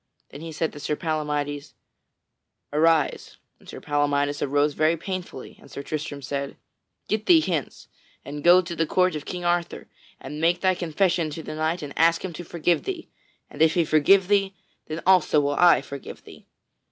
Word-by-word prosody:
Then 140 - -10
he 165 0 -7
said 160 +1 -2
to 145 - -9
Sir 150 +1 -2
Palamydes, 150 -3 -3 1.0
"Arise." 160 0 +1 0.2
And - - -17
Sir - - -8
Palamydes 145 0 0
arose 145 +1 +1
very 155 +3 +2
painfully, 180 -6 -7
and 140 - -16
Sir 140 - -7
Tristram 145 -1 -5
said: 140 +1 -4 0.5
"Get 215 0 -2
thee 340 -2 +7
hence, 170 - -3 0.4
and 145 +1 -7
go 180 +2 +6
to 170 -1 -6
the 165 -1 0
court 185 +2 +2
of 150 - -6
King 180 -1 -6
Arthur 175 0 -1 0.3
and 150 +3 -7
make 170 +2 +2
thy 185 -1 +3
confession 175 -1 0
to 160 +2 -7
the - - -7
King 155 -1 -2
and - - -9
ask 165 +2 +3
him 180 - -6
to 175 - -7
forgive 170 0 -1
thee, 365 -4 -5 0.4
and 145 - -9
if 160 0 +4
he 170 -2 +2
forgive 180 +6 +4
thee, 195 -1 +1 0.3
then 155 +1 -6
also 165 -6 +4
I 170 +4 +5
will - - -3
forgive 140 -1 -9
thee." - - -15
160 Hz, 185 wpm, -24 LUFS, 145-175 Hz, 1.0 s, thee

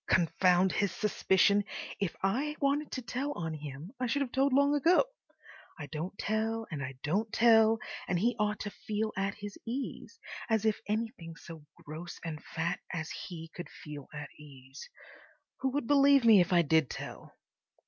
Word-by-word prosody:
Confound 180 +1 +4
his 200 -3 +1
suspicion! 200 +1 +3 0.4
If 195 -4 -1
I 270 +10 0
wanted 285 +1 +1
to 255 - -3
tell 270 +5 -2
on 160 - -4
him 150 +3 -7
I 250 - 0
should 280 +4 +1
have 255 - -6
told 270 +2 +2
long 280 +2 +4
ago. 330 - +4 0.7
I 155 - -6
don't 170 +6 -5
tell 225 +1 -1
and 145 -3 -3
I 135 0 -6
don't 205 +8 0
tell, 225 -1 +5 0.3
and 180 - +1
he 235 +7 +2
ought 210 0 0
to 205 - -4
feel 215 +1 -3
at 195 +1 -1
his 205 -1 -8
ease. 265 - -5 0.3
As 220 -1 +2
if 215 -1 +1
anything 210 -6 -3
so 160 -3 -11 0.2
gross 160 +4 -7
and 155 -2 -5
fat 170 +2 -2
as 160 -3 -4
he 165 -3 -7
could 175 - -7
feel 150 -5 -9
at 150 -1 -7
ease! 135 -2 -12 0.7
Who 265 - +1
would 290 -3 -1
believe 280 -1 +5
me 215 -4 +8
if 175 - 0
I 175 -1 +5
did 160 -2 +3
tell? - - -8
200 Hz, 175 wpm, -31 LUFS, 165-230 Hz, 0.7 s, me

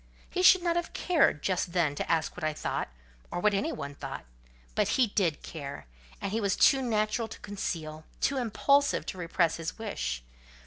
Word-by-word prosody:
He 365 - 0
should 370 -1 +7
not 340 -1 +1
have 345 - -2
cared 310 - +2
just 180 -2 0
then 165 -5 +2
to 145 - -3
ask 165 -1 +1
what 180 - -8
I 155 0 +1
thought, - - -2 0.4
or - - -3
what 210 +3 +3
anybody 155 -8 -2
thought, 140 - -7 0.5
but - - +2
he 260 - +5
did 190 -8 0
care, 140 -3 -7 0.3
and 195 - -3
he 225 +2 0
was 200 -2 +1
too 270 - +5
natural 220 -1 0
to - - -10
conceal, 160 -6 -4 0.2
too 275 - +1
impulsive 280 +4 +2
to 185 - -6
repress 170 -1 +1
his 165 0 -5
wish. - - -3
190 Hz, 185 wpm, -29 LUFS, 155-235 Hz, 0.5 s, should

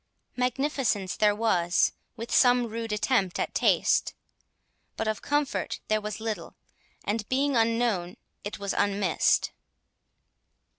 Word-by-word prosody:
Magnificence 250 -6 0
there 210 -2 +3
was, 180 -6 +2 0.2
with 230 0 -7
some 245 -1 +5
rude 225 0 -5
attempt 210 -3 +1
at - - -2
taste; - - +2 0.8
but 225 - -2
of 215 -1 -2
comfort 290 -1 -1
there 215 0 +2
was 210 0 -5
little, 220 -1 -5 0.5
and, 210 0 -3
being 275 +1 +1
unknown, 225 -6 +1 0.3
it 205 - -5
was 200 -1 -3
unmissed. 200 -4 +1
220 Hz, 115 wpm, -27 LUFS, 205-245 Hz, 0.8 s, some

